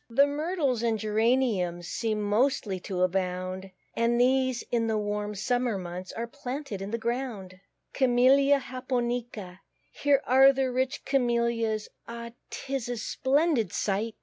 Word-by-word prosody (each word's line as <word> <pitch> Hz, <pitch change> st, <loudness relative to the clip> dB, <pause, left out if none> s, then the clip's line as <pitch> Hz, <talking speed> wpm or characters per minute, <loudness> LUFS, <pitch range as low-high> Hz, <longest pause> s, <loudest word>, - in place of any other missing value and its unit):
The 275 Hz, +5 st, +5 dB
Myrtles 290 Hz, -4 st, -1 dB
and 230 Hz, -2 st, +1 dB
Geraniums 215 Hz, -5 st, +1 dB
Seem 220 Hz, 0 st, -2 dB
mostly 210 Hz, -2 st, +1 dB
to 180 Hz, 0 st, -2 dB
abound; 185 Hz, +1 st, -2 dB, 0.3 s
And 235 Hz, +1 st, +2 dB
these, 260 Hz, 0 st, +2 dB
in 230 Hz, -1 st, +1 dB
the 220 Hz, -1 st, 0 dB
warm 210 Hz, 0 st, -2 dB
summer 245 Hz, +2 st, 0 dB
months, 180 Hz, 0 st, -6 dB
Are 230 Hz, -, -3 dB
planted 260 Hz, -3 st, -6 dB
in 195 Hz, -, -5 dB
the 230 Hz, -, -2 dB
ground. 230 Hz, -6 st, -4 dB, 0.3 s
CAMELLIA 270 Hz, +2 st, +4 dB
JAPONICA. 240 Hz, -7 st, -3 dB, 0.3 s
Here 285 Hz, -1 st, +2 dB
are 265 Hz, +2 st, +7 dB
the 265 Hz, -1 st, -1 dB
rich 260 Hz, +1 st, -2 dB
Camellias; 235 Hz, -4 st, 0 dB, 0.2 s
Oh, 235 Hz, 0 st, -7 dB, 0.2 s
'tis 265 Hz, -3 st, -4 dB
a 245 Hz, -, -2 dB
splendid 265 Hz, -, +1 dB
sight! 210 Hz, +3 st, -1 dB
235 Hz, 135 wpm, -28 LUFS, 205-260 Hz, 0.3 s, are